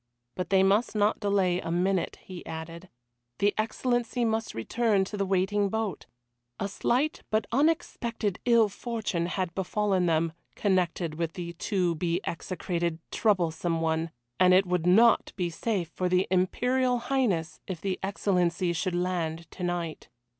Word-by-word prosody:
But 180 Hz, -, -4 dB
they 190 Hz, -1 st, +5 dB
must 205 Hz, +5 st, +2 dB
not 210 Hz, 0 st, +2 dB
delay 195 Hz, -4 st, +2 dB
a -, -, -5 dB
minute, 180 Hz, +2 st, 0 dB
he 185 Hz, -2 st, -9 dB
added. 165 Hz, +3 st, -7 dB, 0.5 s
The 205 Hz, 0 st, +2 dB
Excellency 240 Hz, +2 st, 0 dB
must 225 Hz, 0 st, -1 dB
return 210 Hz, -, +1 dB
to 210 Hz, -, -6 dB
the 200 Hz, -1 st, -1 dB
waiting 195 Hz, +2 st, +1 dB
boat! 220 Hz, -4 st, -3 dB, 0.5 s
A 200 Hz, -, -1 dB
slight 255 Hz, +9 st, 0 dB
but 215 Hz, -1 st, +1 dB
unexpected 240 Hz, -, 0 dB
ill 235 Hz, -3 st, +5 dB
fortune 205 Hz, -5 st, -3 dB
had 185 Hz, -1 st, -2 dB
befallen 190 Hz, -1 st, 0 dB
them, 165 Hz, 0 st, +1 dB, 0.2 s
connected 180 Hz, -4 st, 0 dB
with 165 Hz, -1 st, -1 dB
the 170 Hz, -1 st, -6 dB
to 180 Hz, 0 st, 0 dB
be 170 Hz, +1 st, -1 dB
execrated 170 Hz, -1 st, -2 dB
Troublesome 170 Hz, -5 st, +1 dB
one, 160 Hz, 0 st, 0 dB, 0.3 s
and 185 Hz, 0 st, +6 dB
it 190 Hz, +1 st, +5 dB
would 180 Hz, -1 st, 0 dB
not 225 Hz, +5 st, +5 dB
be 180 Hz, -3 st, -1 dB
safe 185 Hz, -1 st, -2 dB
for 180 Hz, +1 st, -2 dB
the 180 Hz, +1 st, +3 dB
Imperial 245 Hz, +7 st, +2 dB
Highness 235 Hz, -10 st, 0 dB
if 185 Hz, -4 st, -4 dB
the 190 Hz, +1 st, -2 dB
Excellency 180 Hz, -3 st, 0 dB
should 175 Hz, +2 st, -1 dB
land 170 Hz, -2 st, -1 dB
tonight. 175 Hz, -3 st, -4 dB
185 Hz, 145 wpm, -28 LUFS, 170-215 Hz, 0.5 s, and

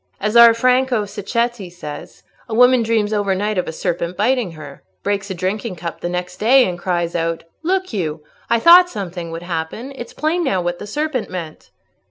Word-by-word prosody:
As 210 Hz, +2 st, -2 dB
our 235 Hz, -1 st, +9 dB
Franco 250 Hz, -2 st, +2 dB
Sacchetti 210 Hz, +1 st, -2 dB
says, 175 Hz, 0 st, -9 dB, 0.3 s
a 220 Hz, -, -2 dB
woman 250 Hz, +1 st, +5 dB
dreams 220 Hz, -2 st, 0 dB
over 200 Hz, -2 st, +1 dB
night 205 Hz, 0 st, -1 dB
of -, -, -2 dB
a -, -, -3 dB
serpent 170 Hz, +1 st, -3 dB
biting 225 Hz, -3 st, +1 dB
her, 150 Hz, -3 st, -11 dB, 0.2 s
breaks 200 Hz, 0 st, -1 dB
a 190 Hz, -, -4 dB
drinking 190 Hz, +3 st, -3 dB
cup 170 Hz, 0 st, -7 dB
the 175 Hz, -, -2 dB
next 180 Hz, 0 st, -4 dB
day, 250 Hz, +5 st, +5 dB
and 175 Hz, -1 st, -4 dB
cries 175 Hz, -2 st, -1 dB
out, 165 Hz, 0 st, -1 dB, 0.2 s
'Look 370 Hz, -1 st, -1 dB
you, 160 Hz, -6 st, -3 dB, 0.3 s
I 235 Hz, -, +4 dB
thought 355 Hz, +6 st, +8 dB
something 175 Hz, -, -6 dB
would 165 Hz, +1 st, -6 dB
happen—it's 215 Hz, +10 st, -5 dB
plain 330 Hz, +3 st, 0 dB
now 195 Hz, -, +1 dB
what 175 Hz, 0 st, -2 dB
the 205 Hz, -, -7 dB
serpent 295 Hz, +1 st, -2 dB
meant. 170 Hz, -4 st, -7 dB
205 Hz, 190 wpm, -19 LUFS, 175-240 Hz, 0.3 s, our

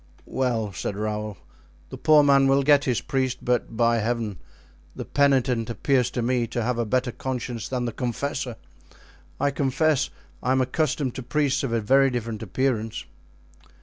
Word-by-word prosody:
"Well," 115 Hz, -6 st, -1 dB
said 95 Hz, -, -4 dB
Raoul, 105 Hz, -1 st, -3 dB, 0.5 s
"the -, -, -6 dB
poor 155 Hz, -1 st, +6 dB
man 140 Hz, -1 st, +5 dB
will 135 Hz, +1 st, +3 dB
get 145 Hz, 0 st, +4 dB
his 125 Hz, -3 st, 0 dB
priest, 130 Hz, -2 st, -2 dB
but, 120 Hz, -2 st, 0 dB
by 115 Hz, 0 st, +3 dB
Heaven, 110 Hz, -3 st, -2 dB, 0.6 s
the -, -, -6 dB
penitent 130 Hz, -5 st, +2 dB
appears 125 Hz, +3 st, +1 dB
to 125 Hz, -1 st, -3 dB
me 120 Hz, -1 st, +1 dB
to 120 Hz, +1 st, -2 dB
have 120 Hz, +1 st, -1 dB
a 115 Hz, -, -1 dB
better 125 Hz, +3 st, 0 dB
conscience 120 Hz, -3 st, -4 dB
than 125 Hz, -2 st, -2 dB
the 120 Hz, -, -2 dB
confessor. 125 Hz, +1 st, -3 dB, 0.8 s
I 140 Hz, +1 st, +2 dB
confess 140 Hz, +2 st, +1 dB, 0.3 s
I 130 Hz, -, +1 dB
am 130 Hz, -, +2 dB
accustomed 130 Hz, 0 st, 0 dB
to 130 Hz, -, -6 dB
priests 140 Hz, +2 st, 0 dB
of 135 Hz, -, -2 dB
a 115 Hz, -, +1 dB
very 135 Hz, +5 st, +4 dB
different 115 Hz, -3 st, -4 dB
appearance." 115 Hz, -, -1 dB
125 Hz, 165 wpm, -25 LUFS, 115-135 Hz, 0.8 s, poor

